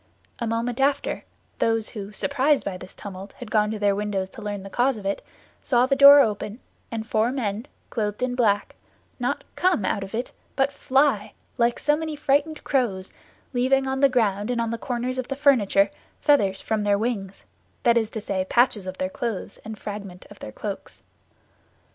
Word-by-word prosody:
A 235 - -2
moment 230 +2 -1
after, 280 +1 0 0.3
those 225 -1 +1
who, 205 -3 -7
surprised 280 +5 +1
by 200 - -2
this 180 - -10
tumult, 195 0 -8
had 245 -4 -10
gone 210 -1 +3
to 220 - -3
their 205 -1 +2
windows 200 -2 -2
to - - -10
learn 205 -2 -4
the 195 - -8
cause 245 +2 +2
of 205 - -9
it, 195 - -1 0.4
saw 245 -1 +3
the 275 +1 +2
door 280 +1 +10
open, 210 -1 -1 0.3
and 225 -1 -4
four 220 +1 +1
men, 225 -2 -3 0.2
clothed 210 0 -2
in 255 -1 0
black, 210 -5 +1 0.4
not - - -1
come 360 - +2
out 195 - 0
of 195 +3 -6
it, 240 +3 -3 0.2
but 275 +1 +1
fly, 265 -7 +2 0.3
like 235 0 +3
so 295 - +2
many 315 0 -4
frightened 295 +2 +1
crows, 205 -9 0 0.4
leaving 265 +2 +2
on 265 0 -1
the 275 0 +5
ground 210 -4 +1
and 245 -1 0
on 230 -1 0
the 230 - -3
corners 250 +1 -2
of 255 - -3
the 275 - -3
furniture, 215 -8 +4 0.3
feathers 200 -10 +3
from 220 -1 -1
their 205 -1 +3
wings; 200 -4 -3 0.4
that 235 -2 +5
is 225 -2 +2
to 225 - -5
say, 195 -3 -1
patches 235 -5 +2
of 185 0 -5
their 185 - -1
clothes 220 +2 -4
and 220 0 -7
fragments 200 -4 -7
of - - -13
their 105 - -7
cloaks. - - -7
225 Hz, 190 wpm, -24 LUFS, 205-260 Hz, 0.4 s, door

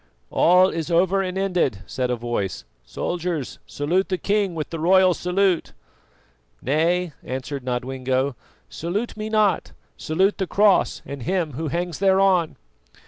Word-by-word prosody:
"All 180 +2 +5
is 165 -2 -4
over 185 +3 +3
and 185 0 -3
ended," 180 - 0
said 125 +7 -2
a 125 - +1
voice. 105 - -3 0.2
"Soldiers, 170 - -4
salute 175 +7 0
the 185 - 0
king 200 -2 0
with 155 -2 -4
the 165 - -4
royal 185 +2 +5
salute." 180 0 0 0.9
"Nay," 165 +5 0
answered 130 +1 -5
Nodwengo. 130 +1 -1 0.3
"Salute 175 - -4
me 215 0 -5
not, 215 -3 +1 0.2
salute 190 +7 +1
the 190 - -1
Cross 205 0 +3
and 140 -1 -7
him 170 +3 -1
who 155 +5 -4
hangs 175 +1 -3
thereon." 190 -3 +3
175 Hz, 140 wpm, -23 LUFS, 140-190 Hz, 0.9 s, All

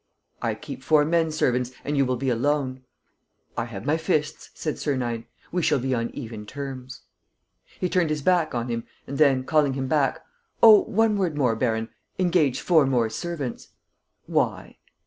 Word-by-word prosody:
"I - - -1
keep - - -8
four 150 -1 +4
men 165 0 +2
servants 125 -5 0 0.2
and 145 - -1
you 135 -2 +3
will 130 - +1
be 130 +2 -2
alone." 130 +1 0 0.7
"I 115 - -1
have 110 -3 -8
my 155 +2 +2
fists," 155 -2 -1
said 155 - -3
Sernine. 120 -5 -2 0.2
"We 180 - 0
shall 150 - +3
be 130 0 -1
on 115 -1 -1
even 110 -6 -7
terms." 130 -2 -7 0.8
He 180 - 0
turned 180 -2 +1
his 150 -2 -2
back 175 -5 +2
on 120 0 -2
him 115 -1 -2 0.2
and 140 +2 -6
then, 135 -4 +4
calling 145 -1 +2
him 135 0 -3
back: 140 -1 +1 0.4
"Oh, 215 -3 +10
one 220 0 +2
word 170 -6 0
more, 125 -5 +2
baron. 110 0 -1 0.3
Engage 175 -7 +2
four 160 -6 +4
more 120 -4 +1
servants." 150 -3 -5 0.6
"Why?" - - -1
140 Hz, 170 wpm, -25 LUFS, 125-155 Hz, 0.8 s, Oh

